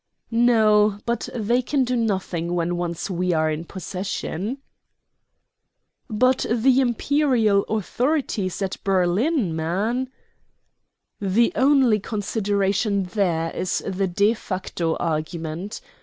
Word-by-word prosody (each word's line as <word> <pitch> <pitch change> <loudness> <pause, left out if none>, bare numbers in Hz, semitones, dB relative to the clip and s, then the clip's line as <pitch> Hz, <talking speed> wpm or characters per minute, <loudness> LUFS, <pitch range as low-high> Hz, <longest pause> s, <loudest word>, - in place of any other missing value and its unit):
"No; 215 -3 +4
but 235 -1 -2
they 235 +2 +1
can 270 +2 0
do 250 0 -1
nothing 190 -6 -1
when 175 0 0
once 175 -1 -3
we 180 -1 -1
are 155 -1 +1
in 155 +2 -4
possession." 190 - -4 1.5
"But 255 +4 +2
the 250 +3 +3
Imperial 240 -4 +2
authorities 220 - -1
at 190 - -3
Berlin, 195 - +1
man?" 205 +11 -1 1.1
"The 210 +4 +2
one 260 -3 +4
consideration 200 0 0
there 180 -4 -1
is 185 0 -2
the 195 0 -1
de 200 +5 +2
facto 185 -6 -3
argument. 160 +3 -3
200 Hz, 105 wpm, -23 LUFS, 180-235 Hz, 1.5 s, No